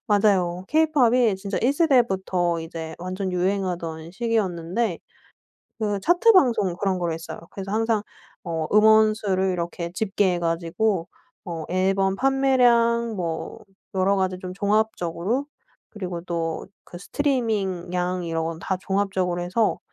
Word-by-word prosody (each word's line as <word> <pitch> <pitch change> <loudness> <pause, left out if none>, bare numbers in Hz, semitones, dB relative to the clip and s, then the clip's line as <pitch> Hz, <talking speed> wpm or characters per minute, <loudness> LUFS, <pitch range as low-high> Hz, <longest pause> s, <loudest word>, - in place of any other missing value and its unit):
맞아요. 190 -4 +2
케이팝이 255 -8 +3
진짜 195 +1 -3
1 245 - +2
세대부터 190 - +2
이제 160 0 -6
완전 185 +2 -4
유행하던 180 -3 -2
시기였는데 195 -2 -1 0.8
그 205 -3 -1
차트 350 - +4
방송 240 - +3
그런 190 +1 -1
거를 170 -2 -1
했어요. 160 0 -7
그래서 195 0 -7
항상 225 0 +1 0.4
어 160 -2 -2
음원 215 +1 +6
수를 190 -3 0
이렇게 170 -1 -4
집계해 195 -2 0
가지고 170 +3 0 0.4
어 165 -3 -5
앨범 190 +1 +1
판매량 240 -3 +3
뭐 170 -4 -4 0.4
여러 190 +1 +2
가지 185 -1 0
좀 185 0 -7
종합적으로 205 +3 0 0.4
그리고 180 -5 -5
또 165 -2 -3 0.2
그 - - -10
스트리밍 205 - -1
양 180 0 -1
이런 165 -1 -2
건 165 0 -4
다 185 +2 -2
종합적으로 190 -3 -1
해서 200 +5 +1
190 Hz, 285 characters per minute, -24 LUFS, 175-220 Hz, 0.8 s, 음원